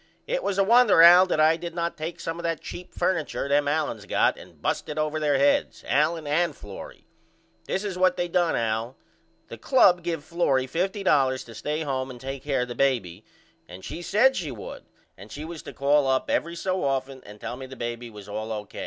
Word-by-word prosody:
It - - -1
was 195 - -2
a 195 - +4
wonder 230 -5 +6
Al 175 +2 +9
that 170 - 0
I 160 +1 +5
did 170 0 -7
not 170 -1 -2
take 160 +2 -6
some 165 +1 -4
of - - -7
that 165 -2 -1
cheap 180 - -9
furniture 165 -6 -1
them 145 +1 +2
Aliens 145 -8 -2
got - - +2
and - - -15
bust - - -2
it 150 - -5
over 155 0 -1
there 145 -2 +2
heads, 140 +1 +1
Allen 155 +3 +1
and 165 +4 0
Florrie. 100 -2 -11 0.6
This 190 - -2
is 190 -3 -4
what 185 0 +3
they 175 - -1
done 175 -1 +1
Al. 115 +2 -2 0.5
The - - -9
club 185 -9 +4
give 165 -3 -3
Florrie 150 -5 +1
$50.00 150 -5 +1
to 115 - -12
stay 150 +7 -3
home 130 -2 -2
and 125 -2 -9
take 135 +1 -6
care 140 -3 0
of - - -6
the - - -4
baby 115 -9 0 0.5
and 90 +2 -10
she 170 - -6
said 245 +9 +3
she 165 -5 -3
would 115 -6 -9 0.3
and 100 +3 -12
she 150 +2 -7
was 165 -1 -7
to - - -9
call 140 0 +2
up 130 0 0
every 170 +1 -1
so 185 +2 -2
often 135 -1 -2
and 105 0 -13
tell 115 +2 -5
me 130 +1 -8
the 135 - -10
baby 120 0 -5
was 105 -2 -12
all 110 +2 -5
O. 105 -1 -5
150 Hz, 220 wpm, -25 LUFS, 130-170 Hz, 0.6 s, Al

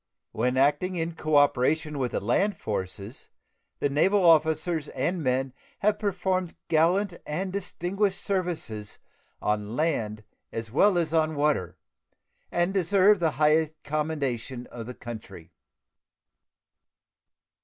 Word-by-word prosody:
When 125 +3 0
acting 145 +7 +2
in 165 0 -2
cooperation 150 -1 +2
with 125 -2 -1
the - - +1
land 195 - +1
forces, 100 +2 -5 0.5
the - - +1
naval 185 +7 +3
officers 160 -1 +3
and 165 +7 -2
men 130 -1 0 0.2
have 210 +1 +1
performed 185 -3 -1
gallant 175 +5 +3
and 185 +5 -3
distinguished 195 +1 -1
services 170 - -3 0.5
on 105 +1 -1
land 115 -9 -1 0.3
as 115 -1 -5
well 190 - +4
as 165 -2 0
on 160 -1 +2
water, 145 -9 0 0.7
and 175 +2 +1
deserve 195 +2 +4
the 160 -3 +1
high 155 +1 +3
commendation 140 -5 -2
of 115 -2 -7
the 125 - -7
country. 105 -8 -9
155 Hz, 115 wpm, -27 LUFS, 125-180 Hz, 0.7 s, well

